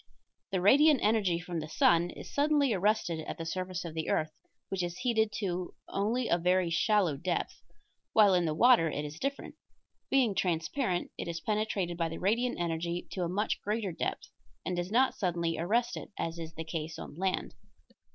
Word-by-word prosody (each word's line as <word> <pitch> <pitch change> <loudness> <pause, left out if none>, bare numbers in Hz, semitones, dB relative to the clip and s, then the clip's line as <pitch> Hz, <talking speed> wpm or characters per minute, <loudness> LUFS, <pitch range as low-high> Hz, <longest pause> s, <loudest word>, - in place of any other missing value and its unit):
The 190 -2 0
radiant 285 - +6
energy 205 -6 +2
from 175 -1 -4
the 155 0 -6
sun 170 +2 +3
is - - -10
suddenly 285 -3 +3
arrested 195 -4 +1
at - - -5
the 165 - -5
surface 185 +1 -3
of 165 - -6
the 160 -1 -3
earth, 155 0 +1 0.4
which 190 -1 -2
is 175 0 -3
heated 220 -4 +1
to 180 -3 -3
only 230 +5 0
a 170 - +2
very 180 0 +2
shallow 185 -2 +2
depth, 175 +4 -3 0.5
while 210 -3 +6
in 180 -1 +3
the 155 -1 -1
water 230 -5 +5
it 150 0 -3
is 150 +2 -8
different; 275 +1 -3 0.6
being 255 -6 +3
transparent 180 - -1
it - - -4
is 170 0 -3
penetrated 205 -3 -1
by 165 -1 0
the 165 - -6
radiant 235 +5 0
energy 170 +1 -2
to 185 - -4
a 175 - 0
much 205 +4 -1
greater 210 -2 -2
depth 160 - -4 0.3
and 180 - -1
does 175 +1 -2
not 255 +5 +3
suddenly 170 -4 -1
arrest 235 +8 +1
it, - - -7
as 165 0 -3
is 165 -1 -7
the 160 - -4
case 160 0 -4
on - - -8
land. 185 +4 -2
180 Hz, 190 wpm, -30 LUFS, 170-215 Hz, 0.6 s, radiant